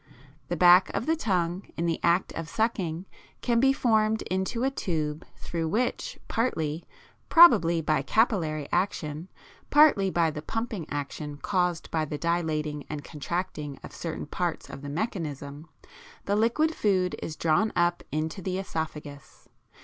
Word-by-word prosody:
The 175 - -2
back 180 +3 +7
of - - -1
the 320 - +2
tongue 185 - -1
in 170 - -1
the 165 -1 0
act 170 +2 +2
of 165 -2 -5
sucking 185 -6 -1 0.4
can 235 -2 +2
be 270 +2 +5
formed 220 -4 +2
into 190 +6 -2
a 270 - +2
tube 155 - -2
through 165 -1 -4
which, 235 +9 -1
partly, 165 -9 -1 0.4
probably 170 - +7
by 155 0 +1
capillary 165 - +1
action, 160 -3 -1 0.4
partly 290 -10 +5
by 170 -3 +2
the 150 -1 -6
pumping 220 -2 -4
action 145 0 -5
caused 180 +1 -1
by 160 -1 0
the 150 0 -5
dilating 155 -3 -1
and 150 -1 -5
contracting 150 -2 -4
of - - -10
certain 165 -2 -5
parts 170 +2 -3
of 135 - -8
the 145 - -6
mechanism, 150 - -4 0.6
the 200 - +1
liquid 235 +9 +2
food 185 -8 +1
is 155 - -5
drawn 165 +8 +2
up 175 0 +2
into 155 +5 -2
the 185 +1 -3
æsophagus. 155 -6 -6
175 Hz, 150 wpm, -27 LUFS, 155-210 Hz, 0.6 s, back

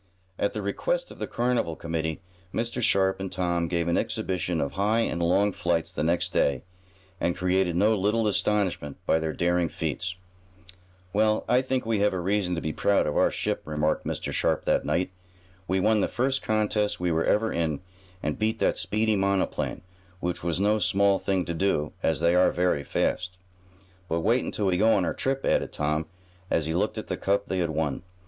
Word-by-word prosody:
At 100 - 0
the 105 - -4
request - - -1
of - - -12
the - - -3
carnival 120 -9 0
committee, 80 0 -3 0.3
Mr. 120 +1 -2
Sharp 95 -3 +3
and 95 -1 -4
Tom 85 -2 0
gave 85 -1 -1
an 85 - +2
exhibition 90 -2 -2
of 70 - -1
high 105 +4 +1
and 85 -6 -1
long 95 +4 +3
flights 85 -2 -1
the 90 - -2
next 85 +2 +1
day, 70 -3 +1 0.6
and 85 - 0
created 90 -1 +1
no 105 +5 +4
little 105 +3 +1
astonishment 100 -8 0
by 80 - +3
their 80 -1 -2
daring 85 0 +1
feats. 80 +4 -3 1.0
"Well, 110 +1 +2
I 125 - +4
think 130 -1 -1
we 110 -2 +1
have 105 0 +2
reason 95 0 0
to 85 - -3
be 80 - -3
proud 100 - +2
of - - -2
our - - +4
ship," - - -2
remarked 75 0 0
Mr. - - -3
Sharp - - +1
that - - +2
night. 90 +1 0 0.6
"We 95 +1 +1
won 105 +2 +3
the - - +2
first 130 +3 0
contest 105 -1 0
we 90 -1 0
were 80 0 +1
ever 110 +1 +2
in, 80 -3 -1 0.4
and 75 0 -2
beat 110 +1 +1
that - - +1
speedy 110 +1 +1
monoplane, 100 -1 0 0.4
which 90 -2 -3
was 85 0 0
no 105 +2 +3
small 100 +1 +3
thing 95 -3 0
to 85 - -3
do, 80 -4 0
as 80 -4 +1
they 85 +1 +4
are 90 +1 +5
very 90 -5 +1
fast." 90 +5 -1 0.7
"But 85 +1 0
wait 115 +7 +2
until 105 - -2
we 90 -2 +2
go 110 +3 +4
on 95 - +2
our - - -1
trip," 135 0 -1
added - - +1
Tom, 75 +1 -1 0.4
as 80 - +1
he 80 - -1
looked 105 +6 0
at 110 - -4
the - - -3
cup 100 +1 0
they 95 - -2
had 85 -2 0
won. 80 -2 -1
95 Hz, 195 wpm, -26 LUFS, 85-105 Hz, 1.0 s, are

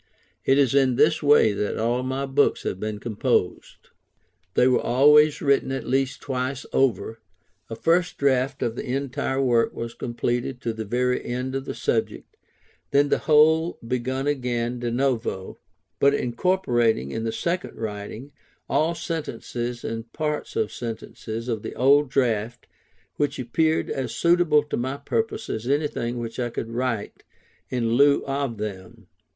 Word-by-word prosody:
It 135 - +4
is 135 -4 +3
in 135 -3 +3
this 155 +4 +3
way 145 -7 +5
that 105 0 -2
all 120 +3 0
my 130 +2 -2
books 140 +1 +2
have 95 - -3
been 105 0 -3
composed. 110 -2 -2 0.7
They 125 - +5
were 125 - +3
always 150 +4 +5
written 140 -2 +2
at 135 -3 -3
least 135 +1 0
twice 130 0 -3
over; 115 -4 +1 0.5
a 115 - -5
first 170 +7 +1
draft 135 -1 +1
of 115 - -1
the - - -4
entire 135 -1 -2
work 120 -4 +2
was 115 0 -5
completed 120 +1 -2
to 115 - -2
the 110 0 -5
very 125 +3 0
end 125 +2 -3
of 135 0 -3
the - - -5
subject, - - -2 0.5
then 145 +1 +3
the - - +2
whole 160 +3 +4
begun 130 +2 -2
again 125 -4 -1
de 120 0 -2
novo; 120 -6 -2 0.4
but 140 0 +4
incorporating, 120 - +1
in 115 - -3
the 115 - -1
second 175 +8 -3
writing, 110 +5 -6 0.4
all 165 +2 +1
sentences 120 -7 -4
and 115 0 -5
parts 150 - -3
of 445 -1 -1
sentences 115 0 -6
of 115 -3 -2
the - - -7
old 140 +3 +4
draft, 120 -3 0 0.5
which 145 -1 0
appeared 155 +6 +1
as 130 -4 -3
suitable 170 -3 +4
to 150 - -4
my 130 +3 -2
purpose 225 +6 -2
as 110 +2 -4
anything 135 -4 -1
which 115 0 -5
I 120 -1 -1
could 115 0 -5
write 115 -3 -3 0.5
in 120 -3 -1
lieu 140 +4 +4
of 135 -4 -2
them. 95 -4 -7
125 Hz, 155 wpm, -24 LUFS, 115-140 Hz, 0.7 s, way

